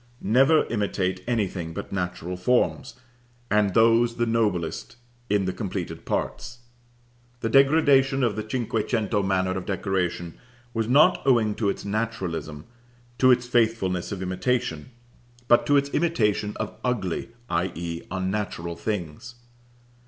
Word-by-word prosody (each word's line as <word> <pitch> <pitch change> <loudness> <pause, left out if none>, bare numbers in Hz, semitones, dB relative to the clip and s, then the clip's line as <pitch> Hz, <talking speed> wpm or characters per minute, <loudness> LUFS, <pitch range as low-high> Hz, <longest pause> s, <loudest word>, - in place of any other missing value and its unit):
Never 135 +9 +4
imitate 95 -4 -2
anything 95 -8 -2
but - - -6
natural 90 -1 -3
forms, 125 +7 0 0.6
and 105 -2 +2
those 115 +1 +4
the 120 - 0
noblest, 105 -7 -1 0.3
in 100 -2 +2
the 95 - -2
completed 100 -5 -5
parts. 120 +1 -3 0.8
The 115 - -1
degradation 135 0 +4
of 115 -4 +1
the 110 - -3
cinque 115 -3 -2
cento 110 -3 0
manner 95 -1 0
of 95 -1 -4
decoration 95 -4 -2 0.3
was 115 -1 -1
not 150 +9 +5
owing 115 -6 +3
to 105 -1 -1
its 100 - -4
naturalism, 100 -8 -3 0.5
to 130 - +5
its 125 -1 +4
faithfulness 110 -7 0
of 95 -2 -4
imitation, 95 -2 -2 0.6
but 120 - +4
to 145 - +5
its 140 0 +1
imitation 110 -11 0
of - - -5
ugly, 115 -7 -2 0.2
i.e. 85 -1 -2
unnatural 95 -2 -3
things. 105 +3 -5
105 Hz, 130 wpm, -25 LUFS, 95-120 Hz, 0.8 s, not